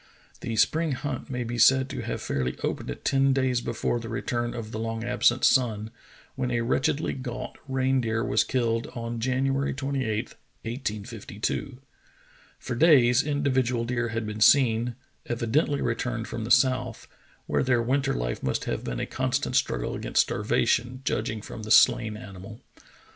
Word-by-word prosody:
The 115 - -4
spring 160 +6 +2
hunt 130 0 -4
may 125 -2 -2
be 120 0 -4
said 130 +3 +5
to - - -4
have - - -4
fairly 65 -2 -2
opened 60 - -3
ten 135 0 +3
days 130 -2 +1
before 120 0 -1
the 115 -1 -7
return 120 0 -2
of 110 -2 -6
the 110 - -4
long 115 0 -3
absent 120 +1 +2
sun, 110 -4 +2 0.4
when 130 -2 -2
a 120 -1 0
wretchedly 140 +5 0
gaunt 130 -1 -6
reindeer 130 -4 0
was 105 - +2
killed 115 -2 0
on 115 0 -4
January 135 +3 0
28, 130 -5 -2 0.3
1852. 115 +1 -4 0.8
For 125 - -5
days 125 -3 +5
individual 130 -5 0
deer 120 0 -1
had 115 0 -3
been 105 0 -5
seen, 120 -1 +4 0.3
evi 115 -1 -2
dently 145 +1 +2
returned 120 0 -2
from 115 -1 -5
the - - -6
south, 125 -2 +2 0.4
where - - 0
their 125 -2 +2
winter 135 +2 +1
life - - -3
must 65 - -1
have - - -3
been 60 -1 -4
a - - -1
constant - - -1
struggle - - 0
against - - +2
starvation, 125 +2 0
judging 110 -4 -2
from - - -8
the 110 - -7
slain 115 -2 +5
animal. 100 +2 -10
120 Hz, 160 wpm, -26 LUFS, 115-130 Hz, 0.8 s, said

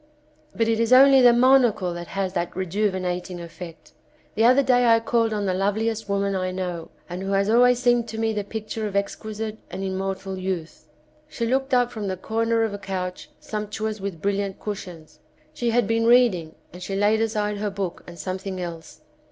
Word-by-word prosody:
But 230 - +1
it 225 -1 +1
is 230 +1 +1
only 270 +1 +8
the 245 -1 +8
monocle 240 -7 +4
which 175 0 -7
has 195 -1 -3
that 175 -2 -3
rejuvinating 185 -1 -2
effect. 170 0 -10 0.4
The 225 - +2
other 255 +3 +5
day 245 -2 +3
I 230 0 +6
called 230 0 +1
on 210 -1 -1
the 185 - 0
loveliest 210 +3 -1
woman 200 0 0
I 185 -1 -1
know, 180 -3 -4 0.2
and 180 +1 -6
who 195 +1 -2
has 195 +2 +2
always 245 +1 +5
seemed 240 -1 +2
to 220 - -7
me 225 0 0
the 210 -1 -2
picture 215 +1 -5
of 200 - -7
exquisite 215 +2 -3
and 190 +1 -5
immortal 190 0 -3
youth. 185 -3 -5 0.4
She 245 -6 -3
looked 265 +3 0
up 245 -1 +2
from 215 -3 -5
the 190 -1 -3
corner 225 +3 0
of 220 -2 -1
a 205 - -5
couch 185 -2 -5
sumptuous 215 0 -4
with 190 -5 -5
brilUant 200 -1 -1
cushions. 170 -7 -8 0.3
She 240 - -1
had 235 0 +2
been 225 +2 +1
reading, 225 -10 +3 0.2
and 180 - -10
she 195 +2 -4
laid 210 +2 +2
aside 210 -2 -1
her 205 0 -2
book 195 -3 -5
and 170 -1 -10
something 185 +2 -5
else. 170 -2 -7
205 Hz, 195 wpm, -24 LUFS, 185-225 Hz, 0.4 s, only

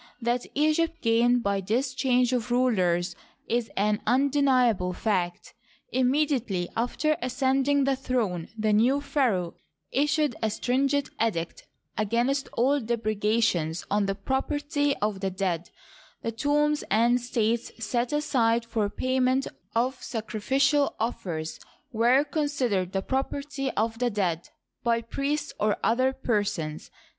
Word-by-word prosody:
That 240 0 -1
Egypt 315 +3 +1
gained 235 +1 +3
by 200 -1 0
this 245 +7 -1
change 250 -1 +2
of 245 -1 -1
rulers 185 -8 +1 0.3
is 235 0 0
an 210 +1 +1
undeni 265 -2 +4
able 180 -3 -3
fact. 180 -3 -2 0.4
Immediately 255 -8 +1
after 285 +6 0
ascending 270 +2 +1
the 270 0 +2
throne, 225 -10 -2
the 215 -1 +1
new 245 +7 +4
pharaoh 240 - 0 0.4
issued 295 -1 +1
a 220 - +1
stringent 275 +5 0
edict 170 -7 -3 0.3
against 240 +6 0
all 275 +4 +2
depreda 220 -1 0
tions 165 -5 0
on 205 0 +2
the 195 - -1
property 290 +5 -1
of 210 -2 -1
the 195 0 -1
dead 185 -3 -2 0.5
(the 230 - -1
tombs 295 +5 +1
and 235 +4 +4
estates 235 -1 -1
set 235 +2 -1
aside 235 -6 +1
for 225 -3 -1
payment 255 +4 +1 0.3
of 250 +3 0
sacrificial 260 +6 0
offers 170 -8 -3 0.3
were 245 +4 +4
considered 275 - -1
the 195 0 -1
property 275 +2 -2
of 225 +1 -1
the 245 -1 +2
dead) 180 -6 -1 0.3
by 235 -1 +2
priests 285 +6 -3
or 210 0 +1
other 255 +3 +3
persons. 205 -11 -2
240 Hz, 130 wpm, -27 LUFS, 210-270 Hz, 0.5 s, undeni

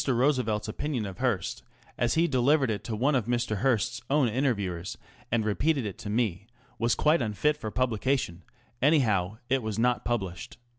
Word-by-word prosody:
Roosevelt's 125 -5 +1
opinion 125 +1 -2
of 95 -2 -7
Mr. - - -19
Hearst, 120 -8 -1 0.3
as 120 0 +1
he 165 +1 +3
delivered 135 -1 +3
it 105 - -3
to 115 - -3
one 135 +7 +2
of 125 -5 +1
Mr. 120 -3 0
Hearst's 120 +1 +1
own 140 -2 +3
interviewers, 100 -8 -1 0.3
and 115 -2 +1
repeated 135 +5 +1
it 105 +2 -6
to 115 -3 -6
me, 105 -3 -1 0.3
was 115 +1 +2
quite 155 0 +3
unfit 120 +7 +1
for 120 -7 -5
publication 120 -5 0
ŌĆö 115 - -34
anyhow, 110 - +3
it 135 0 +1
was 110 -2 -3
not 120 +1 +2
published. 95 -7 -3
120 Hz, 180 wpm, -28 LUFS, 105-135 Hz, 0.3 s, he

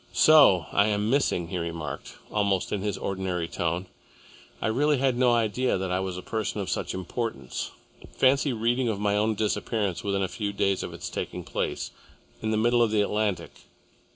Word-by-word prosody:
"So 140 - +6
I 100 +1 +4
am 105 +1 0
missing," 110 - +1
he 90 - -2
remarked, 85 -4 -5 0.2
almost 100 -3 0
in 100 - -1
his 100 -1 -2
ordinary 95 -3 -2
tone. 85 +2 -2 0.7
"I - - -3
really 145 +7 +2
had 130 -1 +2
no 125 0 +4
idea 120 +1 +1
that 95 0 -3
I 90 - +1
was 95 -1 -3
a 90 - -7
person 110 -1 -2
of 100 - -3
such - - -2
importance. 95 - -4 0.4
Fancy 135 +2 +3
reading 120 +2 +1
of 105 -3 -2
my 105 0 +1
own 110 +1 +1
disappearance 105 -2 -1
within 100 -1 0
a - - +1
few 100 0 -4
days 100 -1 +1
of - - -5
its - - -6
taking - - -4
place, - - -3 0.5
in 110 - -1
the 110 - +1
middle 120 +2 +3
of 115 - +4
the 105 -1 +2
Atlantic!" 100 -5 -1
105 Hz, 185 wpm, -27 LUFS, 95-115 Hz, 0.7 s, So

